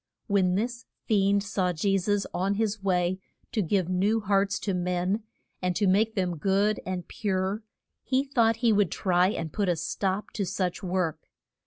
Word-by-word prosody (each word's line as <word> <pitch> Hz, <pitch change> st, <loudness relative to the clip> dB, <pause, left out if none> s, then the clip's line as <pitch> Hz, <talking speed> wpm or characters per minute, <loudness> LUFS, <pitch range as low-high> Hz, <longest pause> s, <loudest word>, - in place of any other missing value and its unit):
When 190 Hz, -4 st, +2 dB
this 240 Hz, +4 st, -2 dB, 0.2 s
fiend 200 Hz, -2 st, +3 dB
saw 190 Hz, -3 st, 0 dB
Je 195 Hz, +4 st, +1 dB
sus 200 Hz, +1 st, +1 dB
on 195 Hz, +2 st, 0 dB
his 215 Hz, -1 st, -1 dB
way 185 Hz, -1 st, +1 dB, 0.3 s
to 230 Hz, -4 st, 0 dB
give 185 Hz, 0 st, +1 dB
new 195 Hz, +5 st, +2 dB
hearts 200 Hz, -1 st, +1 dB
to 200 Hz, -, -1 dB
men, 180 Hz, +3 st, 0 dB, 0.4 s
and 180 Hz, -1 st, 0 dB
to 205 Hz, -, +1 dB
make 215 Hz, +4 st, +3 dB
them 180 Hz, -4 st, -1 dB
good 200 Hz, +5 st, +2 dB
and 185 Hz, -2 st, -3 dB
pure, 195 Hz, 0 st, -1 dB, 0.4 s
he 260 Hz, +1 st, +1 dB
thought 235 Hz, -5 st, +2 dB
he 225 Hz, -, +5 dB
would 205 Hz, -4 st, +3 dB
try 180 Hz, -1 st, +2 dB
and 165 Hz, -7 st, -4 dB
put 200 Hz, -3 st, 0 dB
a 175 Hz, -, +2 dB
stop 190 Hz, +4 st, -2 dB
to 205 Hz, -, -2 dB
such 185 Hz, -1 st, -2 dB
work. 180 Hz, -4 st, -2 dB
195 Hz, 175 wpm, -27 LUFS, 180-210 Hz, 0.4 s, he